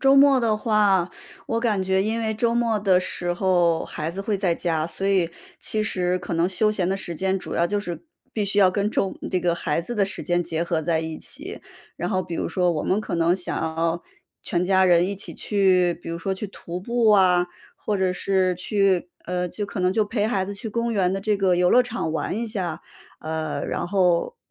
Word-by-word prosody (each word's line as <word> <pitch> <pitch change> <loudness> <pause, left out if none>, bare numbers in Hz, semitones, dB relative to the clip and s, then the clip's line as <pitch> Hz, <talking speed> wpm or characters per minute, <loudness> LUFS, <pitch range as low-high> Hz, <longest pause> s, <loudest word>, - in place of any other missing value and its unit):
周 270 0 +5
末 275 -2 +6
的 220 -2 +2
话， 205 -5 +2 0.4
我 230 0 -1
感 215 -5 +1
觉 190 0 +2
因 220 +3 -1
为 220 -1 0
周 230 +2 +1
末 230 -2 +1
的 190 -3 +4
时 175 -1 -2
候， 175 -2 +2
孩 155 +2 -4
子 190 - -5
会 200 0 -1
在 180 -3 +1
家， 160 -3 -1
所 195 +3 -4
以， 190 -4 +3 0.3
其 215 - -1
实 180 -3 0
可 180 - -6
能 170 +2 +2
休 215 +3 +2
闲 190 -4 -1
的 195 - 0
时 175 -3 -6
间 190 +3 0
主 - - -6
要 170 - +2
就 205 +3 -1
是 175 - -6 0.3
必 215 - -1
须 200 +1 -1
要 190 -2 +6
跟 200 +2 0
周 195 - 0 0.2
这 185 - +1
个 170 -1 +1
孩 160 -1 -1
子 240 +8 -5
的 205 -3 +2
时 200 - -6
间 175 0 +1
结 165 0 -2
合 170 -2 0
在 160 0 0
一 160 -1 -5
起。 - - -9 0.4
然 175 - -2
后 185 -2 0
比 170 - -6
如 - - -2
说 180 -2 +1
我 155 - -2
们 195 - +1
可 215 - -4
能 170 +1 +3
想 180 - -3
要 165 +1 -1 0.4
全 175 0 0
家 190 0 +4
人 175 0 +5
一 200 - -2
起 200 - -6
去， 185 -4 +2
比 175 - -11
如 165 - -3
说 195 +3 -2
去 190 +3 -4
徒 180 -2 -7
步 235 +1 +2
啊， 180 -3 +5 0.3
或 205 -2 -2
者 185 -1 +1
是 185 -1 +1
去 185 -1 +1 0.2
呃， 180 0 -1
就 205 +4 -4
可 200 - -7
能 180 +1 +2
就 215 +1 +2
陪 210 -1 0
孩 200 -4 0
子 200 - -5
去 215 +3 -6
公 235 +2 -1
园 190 -3 +2
的 195 - -2
这 210 +1 +1
个 190 -2 +3
游 180 0 +3
乐 250 - +6
场 235 -9 -3
玩 180 +5 -2
一 235 - -2
下。 185 -7 -3 0.4
呃， 155 -1 -3
然 - - -2
后 180 -3 +2
190 Hz, 250 characters per minute, -24 LUFS, 175-210 Hz, 0.4 s, 末